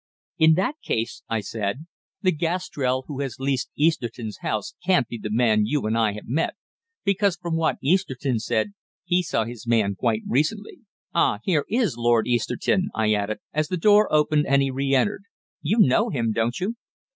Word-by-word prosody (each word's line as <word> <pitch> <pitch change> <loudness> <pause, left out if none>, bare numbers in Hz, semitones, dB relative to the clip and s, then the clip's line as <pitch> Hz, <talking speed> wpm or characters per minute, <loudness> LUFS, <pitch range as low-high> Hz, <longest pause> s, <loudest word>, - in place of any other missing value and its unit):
"In 160 0 +6
that 195 - 0
case," 115 +1 -2
I 115 -1 0
said, 105 +7 -4 0.4
"the 185 - +4
Gastrell 150 -6 -1
who 140 -3 -6
has 135 -4 -3
leased 135 -1 -1
Easterton's 120 -8 -1
house 105 -2 -3
can't 180 -9 +3
be 120 - -6
the 105 - -5
man 110 -2 +3
you 145 0 0
and 110 +1 0
I 110 -3 +2
have 105 - -9
met, 150 +7 -1 0.5
because, 200 -1 +2
from 170 -2 -4
what 165 -1 +1
Easterton 135 -7 +1
said, 115 - -1 0.3
he 180 0 +2
saw 135 -9 -1
his 120 0 -9
man 110 -4 +2
quite 110 +1 -1
recently. 155 - -1 0.3
Ah, 170 - +3
here 160 -6 +1
is 220 - +1
Lord 120 -1 +3
Easterton," 125 - 0
I 110 -1 +2
added, 105 +1 -2
as 155 0 0
the 180 - -2
door 210 +4 +5
opened 150 -1 +3
and 140 0 +4
he 135 - -1
re 135 +1 -1
entered. 200 +10 +1 0.4
"You 185 +9 0
know 135 - +4
him, 115 -4 0
don't 115 +2 -1
you?" 220 +6 -2
135 Hz, 180 wpm, -24 LUFS, 115-170 Hz, 0.5 s, In